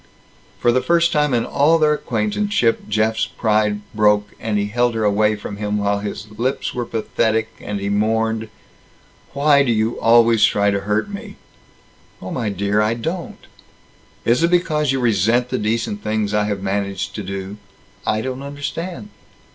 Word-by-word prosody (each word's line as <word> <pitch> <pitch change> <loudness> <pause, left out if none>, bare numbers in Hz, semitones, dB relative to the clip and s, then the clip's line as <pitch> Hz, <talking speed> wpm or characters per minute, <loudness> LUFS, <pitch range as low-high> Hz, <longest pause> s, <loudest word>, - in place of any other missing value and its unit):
For 120 - +3
the 130 +2 +2
first 170 +2 +3
time 150 -2 +2
in 120 -2 +1
all 155 +4 +3
their 155 -1 +3
acquaintanceship, 120 - 0
Jeff's 110 +1 +1
pride 105 -2 0
broke, 105 -1 +2
and 110 -2 -1
he 100 - 0
held 120 +3 0
her 110 - -1
away 105 +1 +2
from 105 -1 -7
him, 105 0 -2
while 100 0 0
his 100 -1 -5
lips 130 +3 -1
were 120 -1 -3
pathetic, 110 0 0
and 105 -1 -4
he 100 - -3
mourned, 110 +2 0 0.8
"Why 140 0 +4
do 135 -4 +2
you 110 +1 0
always 115 -1 +5
try 100 0 +3
to 100 - 0
hurt 105 - +1
me?" 205 0 -8 0.8
"Oh, 95 - -7
my 115 -4 -2
dear, 100 +2 0
I 110 +2 +1
don't." 165 +9 -5 0.8
"Is 120 +4 +3
it 170 - +3
because 155 -5 +1
you 135 - 0
resent 120 +1 +2
the - - -1
decent 105 -1 -1
things 105 -1 -1
I 105 0 +2
have 100 -2 -3
managed 100 0 -2
to 105 - -5
do?" 95 +1 -6 0.5
"I 110 - 0
don't 130 +2 -4
understand." 145 +8 -5
110 Hz, 170 wpm, -20 LUFS, 105-130 Hz, 0.8 s, always